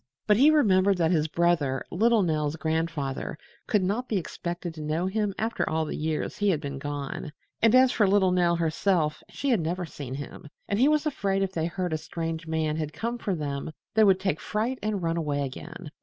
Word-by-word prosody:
But 210 -1 +4
he 280 +6 +7
remembered 200 -10 +4
that 165 -1 +2
his 160 -3 +2
brother, 160 -5 +1
little 225 +3 +3
Nell's 155 -3 0
grandfather, 160 -4 -2 0.3
could 210 -3 +2
not 215 +7 -1
be 215 - +1
expected 175 -1 -4
to 155 - -8
know 155 +4 -1
him 200 0 -1
after 225 +1 -1
all 160 0 0
the - - -4
years 155 0 -2
he 205 -1 +3
had 165 -6 +2
been 140 -3 -5
gone, 145 +1 -5 0.3
and 230 +2 +5
as 255 0 +6
for 210 - +3
little 190 -1 +4
Nell 175 -1 +3
herself, 165 -1 +1
she 280 - -3
had 230 - +3
never 175 +3 -2
seen 140 -5 -7
him, 145 +1 -8 0.2
and 200 - 0
he 260 - +5
was 305 0 +2
afraid 195 -9 0
if 190 - -2
they 165 -2 0
heard 175 0 -3
a 155 - -1
strange 165 0 -4
man 160 -1 0
had 155 -1 -3
come 235 +1 -3
for 195 -5 -1
them 145 -1 -4 0.2
they 220 - +5
would 190 -2 +5
take 190 -5 -1
fright 230 +5 -2
and 210 -4 -2
run 165 0 0
away 145 -3 -1
again. 160 +4 -8
170 Hz, 215 wpm, -27 LUFS, 155-205 Hz, 0.3 s, he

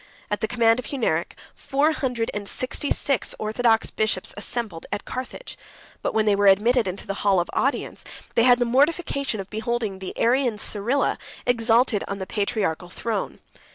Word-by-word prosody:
94 - - +2
At 210 - -2
the 220 - +1
command 230 0 +3
of 250 - -5
Hunneric, 215 - -1 0.2
four 290 +3 +1
hundred 250 -6 -2
and 205 -1 -4
sixty 255 +3 -2
six 275 -3 +1
orthodox 225 +1 +1
bishops 215 -4 0
assembled 205 -5 -4
at - - -3
Carthage; 255 - -7 0.4
but - - -2
when 220 -1 +3
they 210 -1 +4
were 200 0 +3
admitted 220 +4 +4
into 185 +1 -4
the 195 - -3
hall 195 -2 +4
of 175 - -2
audience, 275 +2 -1 0.3
they - - +3
had 245 +1 +6
the 245 - +1
mortification 280 - +1
of 195 - -7
beholding 220 -2 -2
the 190 - -7
Arian 245 -1 +2
Cyrila 220 +6 0 0.3
exalted 230 -2 +3
on 200 - -3
the 190 - -4
patriarchal 195 -4 -1
throne. 215 +2 -4
225 Hz, 175 wpm, -24 LUFS, 205-250 Hz, 0.4 s, had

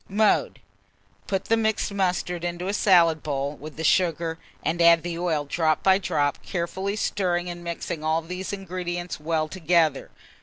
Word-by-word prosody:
Mode. 210 +2 +2 0.7
Put 195 -1 -1
the 225 - +3
mixed 220 -2 0
mustard 180 -2 -1
into 175 +1 -3
a 200 - -1
salad 170 -6 +4
bowl 140 -1 -2
with 150 +2 -10
the 160 - -4
sugar, 165 -1 +1 0.2
and 170 +2 0
add 170 -1 +6
the 170 -1 -4
oil 160 -4 0
drop 155 +1 0
by 190 0 +5
drop, 150 -6 0
carefully 190 +3 -3
stirring 180 -4 -1
and 175 0 -9
mixing 170 -2 -4
all 160 +1 +1
these 180 +3 -5
ingredients 180 -3 -4
well 155 0 -1
together. 160 -4 +1
175 Hz, 160 wpm, -25 LUFS, 160-185 Hz, 0.7 s, add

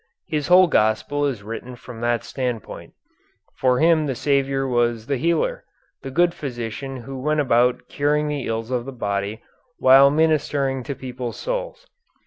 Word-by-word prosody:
His 150 -2 -2
whole 180 +1 +7
gospel 145 +1 +1
is 120 -8 -4
written 115 +4 -7
from 115 -1 -11
that 120 0 0
standpoint. 125 -5 -5 0.6
For 125 -1 +1
him 160 0 +3
the 135 - -2
Saviour 135 0 0
was 120 -3 0
the 140 +1 -1
healer, 170 - 0 0.4
the 135 - -6
good 170 +5 +2
physician 130 -2 -5
who 135 +1 -7
went 150 +2 0
about 125 -3 +2
curing 150 +1 0
the 145 -3 -3
ills 115 +1 -3
of 125 -2 -1
the 135 - -6
body, 100 -2 -3 0.3
while 135 +1 +7
ministering 145 -3 +1
to 140 - -4
people's 125 -2 -6
souls. - - -4
135 Hz, 155 wpm, -22 LUFS, 120-150 Hz, 0.6 s, whole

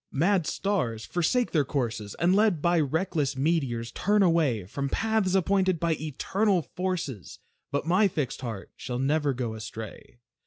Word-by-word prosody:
Mad 170 +3 +2
stars 125 - -1
forsake 205 +8 +1
their 155 -4 +3
courses, 115 -7 -3
And 180 +2 +3
led 205 -5 +3
by 170 +2 +2
reckless 150 -2 0
meteors, 130 -6 0
turn 205 - +2
away 155 - +2
From 140 +8 -3
paths 220 0 +1
appointed 190 -2 +2
by 170 0 +1
Eternal 175 +6 0
Forces; 175 - -3 0.3
But 140 +2 -2
my 185 +5 +4
fixed 150 -10 -3
heart 115 -6 -6
shall 125 - -4
never 145 +2 +1
go 120 -3 -3
astray. 110 +1 -8
155 Hz, 150 wpm, -27 LUFS, 130-185 Hz, 0.3 s, my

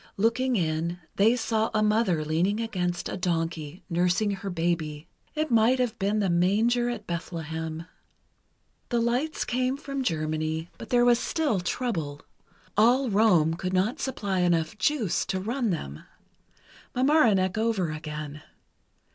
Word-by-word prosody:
Looking 240 +5 +2
in, 165 -1 -1 0.2
they 220 +4 +5
saw 225 -2 0
a 215 - +3
mother 210 -7 +2
leaning 175 +7 +1
against 180 -6 -2
a - - -4
donkey, 165 -2 -2
nursing 180 +4 +1
her 195 0 -4
baby. 165 -3 -2 0.3
It 310 -2 -1
might 230 +3 +4
have 245 -3 -1
been 200 +2 +1
the 205 -2 +1
Manger 220 +8 +2
at 225 -4 -5
Bethlehem. 160 -1 -5 1.0
The 240 - +1
lights 245 +7 0
came 255 +2 0
from 275 -2 -4
Germany, 155 -3 -2
but - - -9
there 245 -2 +4
was 240 -1 +5
still 295 - 0
trouble. 170 - -3 0.5
All 245 +4 +4
Rome 180 -7 +4
could 185 +2 -3
not 190 +6 +1
supply 200 -8 -2
enough 170 -2 +1
"juice" 225 - +1
to 190 - -1
run 235 +4 -1
them. 75 - -4 0.9
Mamaroneck 240 - +3
over 220 -7 0
again. 155 -1 -6
195 Hz, 140 wpm, -27 LUFS, 165-235 Hz, 1.0 s, they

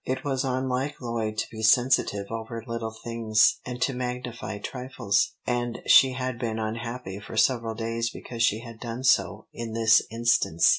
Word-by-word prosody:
It 130 0 -3
was 135 -2 -1
unlike 130 +2 -1
Lloyd 115 -3 -3
to - - 0
be 110 - -7
sensitive 110 -3 +3
over 115 0 -5
little 115 -1 -3
things, 110 -2 +3
and 125 -1 -6
to 135 - 0
magnify 125 -3 -4
trifles, 125 -3 -1
and 120 -1 -1
she 130 -1 +7
had 130 -2 -3
been 115 -3 -2
unhappy 115 -1 -4
for 105 +1 -9
several 115 -1 +2
days 115 +1 -2
because 115 0 -7
she 110 -1 +3
had 115 -2 -11
done 120 +1 -5
so 130 - +2
in 115 -1 -6
this 115 -1 +5
instance. 115 -8 +3
115 Hz, 165 wpm, -26 LUFS, 110-125 Hz, -, she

